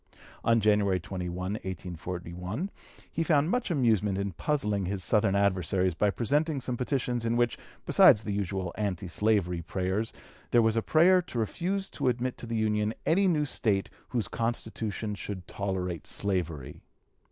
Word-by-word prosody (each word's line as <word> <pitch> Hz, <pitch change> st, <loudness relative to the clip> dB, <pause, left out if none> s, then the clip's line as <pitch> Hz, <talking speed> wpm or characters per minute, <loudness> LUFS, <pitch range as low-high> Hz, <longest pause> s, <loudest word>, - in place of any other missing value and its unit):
On 115 Hz, 0 st, +4 dB
January 105 Hz, -3 st, +3 dB
21, 90 Hz, 0 st, -5 dB
1841, 90 Hz, -, -4 dB, 0.4 s
he -, -, -2 dB
found 155 Hz, 0 st, +3 dB
much 250 Hz, -3 st, 0 dB
amusement 110 Hz, -, +2 dB
in 100 Hz, 0 st, -1 dB
puzzling 105 Hz, -, -1 dB
his 95 Hz, -1 st, -3 dB
Southern 105 Hz, -2 st, +2 dB
adversaries 95 Hz, -2 st, +2 dB
by 105 Hz, +5 st, +2 dB
presenting 145 Hz, +8 st, +1 dB
some 125 Hz, -1 st, -3 dB
petitions 125 Hz, -1 st, -1 dB
in 115 Hz, +1 st, +1 dB
which, 120 Hz, -1 st, +2 dB, 0.3 s
besides 105 Hz, -, +6 dB
the 105 Hz, -, -2 dB
usual 95 Hz, -3 st, -2 dB
anti 95 Hz, -3 st, -2 dB
slavery 90 Hz, -2 st, +1 dB
prayers, 95 Hz, +6 st, -2 dB, 0.4 s
there 120 Hz, -1 st, +5 dB
was 110 Hz, 0 st, +2 dB
a 115 Hz, -, +2 dB
prayer 180 Hz, +8 st, +5 dB
to 170 Hz, -8 st, -8 dB
refuse 180 Hz, -, -1 dB
to 140 Hz, -, -2 dB
admit 125 Hz, +1 st, 0 dB
to 120 Hz, -, -7 dB
the 115 Hz, 0 st, -2 dB
Union 105 Hz, 0 st, +1 dB
any 190 Hz, +4 st, +4 dB
new 155 Hz, -4 st, +2 dB
State 105 Hz, -7 st, 0 dB, 0.2 s
whose 120 Hz, -4 st, -1 dB
constitution 110 Hz, -2 st, -3 dB
should 100 Hz, -3 st, -6 dB
tolerate 90 Hz, -4 st, -3 dB
slavery. 85 Hz, -9 st, -2 dB
105 Hz, 155 wpm, -29 LUFS, 95-120 Hz, 0.4 s, besides